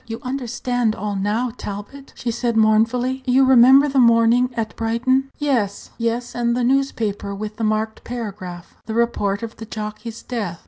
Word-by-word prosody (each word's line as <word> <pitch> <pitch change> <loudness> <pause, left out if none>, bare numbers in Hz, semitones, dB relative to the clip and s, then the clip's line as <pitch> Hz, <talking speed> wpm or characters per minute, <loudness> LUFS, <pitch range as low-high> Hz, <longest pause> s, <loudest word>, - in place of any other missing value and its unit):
You 225 0 -5
understand 245 -3 -1
all 205 0 -3
now, 210 +5 -1
Talbot," 205 +7 -8
she 240 - -3
said 235 0 -1
mournfully. 230 +4 +2
"You 260 +2 +4
remember 265 +2 +7
the 275 -1 +1
morning 235 +1 +4
at 220 -2 -3
Brighton?" 255 +4 0
"Yes, 240 -9 -1
yes; 235 +1 -2
and 235 0 0
the 250 - 0
newspaper 230 -6 0
with 210 +1 -6
the 230 - -3
marked 215 0 -1
paragraph 195 -7 -7
the 220 - -4
report 230 -3 0
of 225 -1 -7
the 225 - -8
jockey's 215 +1 -6
death." 205 -9 -4
230 Hz, 165 wpm, -21 LUFS, 215-250 Hz, -, remember